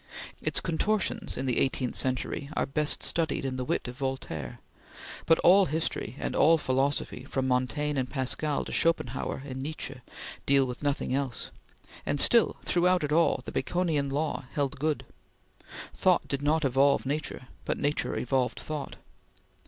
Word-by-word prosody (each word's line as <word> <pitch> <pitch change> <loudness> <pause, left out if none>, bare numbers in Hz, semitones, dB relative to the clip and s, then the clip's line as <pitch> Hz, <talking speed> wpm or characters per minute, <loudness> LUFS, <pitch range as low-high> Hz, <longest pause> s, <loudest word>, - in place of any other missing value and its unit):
Its - - 0
contortions 200 +5 -1
in 135 - -2
the 125 -2 +2
eighteenth 130 -2 0
century 130 +2 -1
are - - +1
best 150 +2 0
studied 160 -4 +1
in 130 -1 -2
the 130 - -2
wit 125 - -1
of 125 +2 -8
Voltaire, 80 - -4 0.7
but 165 - +6
all 190 +1 +6
history 160 -3 -2
and - - -3
all 165 +2 +6
philosophy 135 -2 -1
from 135 -1 -2
Montaigne 135 +3 0
and 130 - -2
Pascal 140 +2 -1
to - - -7
Schopenhauer 135 -5 0
and 130 -2 -5
Nietzsche 135 -2 -5 0.5
deal 140 -1 +5
with 125 -1 -6
nothing 145 -3 -1
else; 135 -3 -2 0.5
and 145 - -1
still, 235 - +5
throughout 180 -1 +3
it 150 - -2
all, 165 +2 +3
the - - -5
Baconian 160 -6 0
law 145 0 -2
held 140 -4 -1
good; 155 +1 -1 0.9
thought - - +2
did 140 0 -2
not 155 +1 +2
evolve 135 +2 +3
nature, 145 -2 -3 0.2
but - - -1
nature 145 +1 -1
evolved 125 0 0
thought. 150 -2 -5
140 Hz, 155 wpm, -28 LUFS, 130-155 Hz, 0.9 s, but